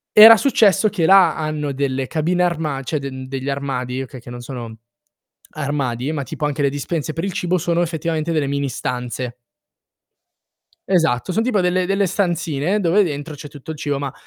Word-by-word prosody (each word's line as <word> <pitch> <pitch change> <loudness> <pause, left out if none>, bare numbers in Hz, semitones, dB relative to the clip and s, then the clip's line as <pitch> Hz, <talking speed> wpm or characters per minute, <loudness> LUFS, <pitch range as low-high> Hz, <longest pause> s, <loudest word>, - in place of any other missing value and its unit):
Era 220 +1 +11
successo 215 -3 +3
che 175 -6 0
là 190 +1 +6
hanno 155 -2 -2
delle 135 -1 -1
cabine 170 +3 0
armad 155 -6 -1
cioè 150 +4 -2
den 130 -1 -7
degli 135 0 -4
armadi, 130 -2 -3
okay, 130 0 -8
che 120 - -13
non 120 0 -7
sono 120 -3 -7 0.8
armadi, 135 -2 -2
ma 150 -3 -3
tipo 150 +3 -4
anche 145 0 -2
le 140 - +3
dispense 150 +2 -3
per 165 - -4
il 195 - -1
cibo 180 +1 0
sono 170 0 0
effettivamente 165 -1 -2
delle 150 -3 0
mini 140 0 -1
stanze. 125 0 -4 1.5
Esatto, 165 -5 +1
son 220 +4 +1
tipo 230 -5 +1
delle 180 0 +1
delle 195 +1 +1
stanzine 175 -1 0
dove 195 +2 +3
dentro 150 -2 -4
c'è 145 - -9
tutto 145 +1 -9
il 155 - -7
cibo, 145 -2 -2
ma, 140 -1 -3
150 Hz, 180 wpm, -20 LUFS, 135-175 Hz, 1.5 s, Era